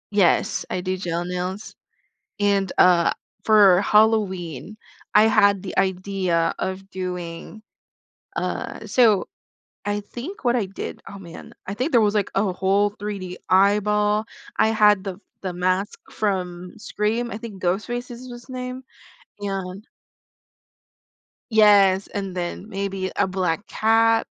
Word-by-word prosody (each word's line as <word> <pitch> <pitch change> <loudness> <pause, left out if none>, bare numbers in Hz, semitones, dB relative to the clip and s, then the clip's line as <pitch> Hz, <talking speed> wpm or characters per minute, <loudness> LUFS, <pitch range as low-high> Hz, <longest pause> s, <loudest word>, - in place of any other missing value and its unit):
Yes. 195 -4 +2
I 185 - -2
do 185 +1 -2
gel 175 -2 -2
nails, 180 +3 -4 0.7
and, 200 -2 +2
uh, 175 -2 +5 0.3
for 205 -4 +6
Halloween, 205 - +1 0.4
I 210 - +7
had 200 -3 +4
the 190 - -6
idea 185 -3 0
of 190 +1 -4
doing, 180 +2 -6 0.7
uh - - -4
So 220 -6 +3 0.6
I 205 0 -1
think 245 - -9
what 240 0 +3
I 220 -5 0
did 190 - -7
oh, 200 - -9
man. 170 -4 -11
I 195 - -4
think 255 +9 -1
there 235 - +6
was, 210 0 +2
like, 205 -2 0
a 195 -1 +2
whole 195 +3 +2
3D 200 -3 -6
eyeball. 210 +2 +3 0.3
I - - +4
had 210 -3 +4
the 195 -2 -5 0.2
the 185 -2 -4
mask 185 +3 -1
from 180 -3 -3
Scream. 220 +3 -2
I - - -5
think 215 -4 -9
Ghostface 230 +8 -2
is 245 +1 -9
his 240 +1 -11
name, 255 0 -5 0.6
and 195 0 -5 1.6
Yes. 200 -3 +5
And 195 -2 -5
then 180 +3 -5
maybe 195 -2 -3
a - - +2
black 185 +1 -2
cat, 225 +1 +3
200 Hz, 135 wpm, -23 LUFS, 185-215 Hz, 1.6 s, I